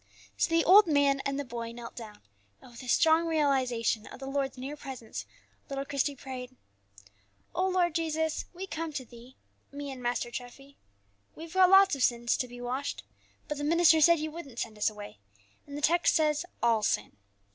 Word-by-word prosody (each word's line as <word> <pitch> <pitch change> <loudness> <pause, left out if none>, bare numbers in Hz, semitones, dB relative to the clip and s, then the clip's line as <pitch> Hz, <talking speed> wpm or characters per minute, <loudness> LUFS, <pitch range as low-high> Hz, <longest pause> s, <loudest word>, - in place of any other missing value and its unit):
So - - +1
the 330 0 +2
old 395 +2 +8
man 285 -2 +3
and 275 0 -2
the 285 - -3
boy 235 -1 -6
knelt 235 0 -9
down, 220 -3 -10 0.4
and, - - -16
with 235 - -11
a 255 - -10
strong 325 +5 +4
realization 260 -8 +1
of - - -11
the 270 - -7
Lord's 275 -1 -2
near 270 +4 -6
presence, 260 -6 -8 0.4
little 275 0 -3
Christie 280 +1 -1
prayed: 255 -1 -8 1.0
"O 370 +1 +1
Lord 360 -2 +1
Jesus, 320 -1 -1
we 365 +2 -7
come 330 -3 -4
to 265 -3 -5
Thee, 240 +2 -15 0.4
me 285 0 -6
and 260 -1 -8
Master 240 0 -2
Treffy: 275 +3 -9 0.6
we've 330 +1 -10
got 375 -1 +6
lots 385 -1 +7
of 275 - -6
sins 235 -1 +2
to 250 - -2
be 245 0 -11
washed, 255 +3 -4 0.4
but 295 -1 -4
the - - -3
minister 325 +1 +5
said 340 +2 +6
you 310 0 -4
wouldn't 290 -7 -10
send 225 -2 -4
us 210 - +3
away, 205 - -11 0.5
and 285 0 -7
the - - -6
text 345 +2 +3
says 310 +1 +1 0.2
all 230 -2 +3
sin. 155 - -1
275 Hz, 190 wpm, -29 LUFS, 245-320 Hz, 1.0 s, old